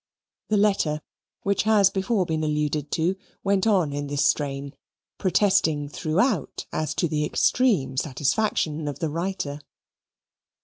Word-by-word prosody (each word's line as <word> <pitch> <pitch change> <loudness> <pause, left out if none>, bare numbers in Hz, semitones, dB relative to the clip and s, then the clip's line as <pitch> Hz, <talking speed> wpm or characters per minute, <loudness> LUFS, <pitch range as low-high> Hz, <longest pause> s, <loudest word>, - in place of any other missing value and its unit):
The 215 - +2
letter, 195 -7 +2 0.4
which 200 0 +1
has 210 -3 +4
been 190 - -1
before 195 -1 +1
alluded 150 -2 -1
to, 170 +4 0 0.3
went 200 +1 +2
on 180 -9 +2
in 145 0 -3
this 145 0 0
strain, 140 -1 -1 0.5
protesting 185 -7 +2
throughout 180 - -1
as 155 -1 -2
to 170 - +1
the 150 -1 -1
extreme 165 - +2
satisfaction 150 +2 0
of 145 - -4
the 165 -3 -2
writer. 165 -3 -3
160 Hz, 130 wpm, -25 LUFS, 150-195 Hz, 0.5 s, has